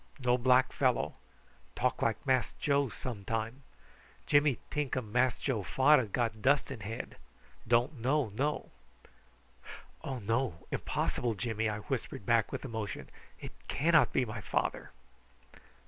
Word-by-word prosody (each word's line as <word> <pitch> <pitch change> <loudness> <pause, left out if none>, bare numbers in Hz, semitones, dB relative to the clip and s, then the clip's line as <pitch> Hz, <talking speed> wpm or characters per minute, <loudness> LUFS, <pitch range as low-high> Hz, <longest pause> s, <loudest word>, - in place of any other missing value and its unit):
No 125 -3 +2
black 125 +1 +4
fellow. 130 -3 +1 0.6
Talk - - 0
like 110 -1 0
Mass 130 -5 +2
Joe 140 -2 +2
some 110 -2 -6
time. 115 +5 -3 0.6
Jimmy 145 -3 +4
tink 145 -3 -1
um 110 -5 -4
Mass 125 +1 +2
Joe 125 -7 -1
fader 135 +5 +4
got 110 0 -1
dust 140 +3 +3
in 130 - -5
head. 105 +2 -6 0.5
Don't 120 +4 +2
know 135 +1 +1
know." 140 +9 -2 1.3
"Oh 135 -2 -3
no! 115 -4 -1
impossible, 120 -3 -1
Jimmy," 110 +2 -1
I 105 0 -3
whispered 120 -5 -4
back 115 -1 +3
with 135 0 -4
emotion. 110 -4 -5 0.3
"It - - -7 0.2
cannot 160 +3 +4
be 130 - +2
my 110 -1 -6
father." - - -2
125 Hz, 135 wpm, -32 LUFS, 110-135 Hz, 1.3 s, black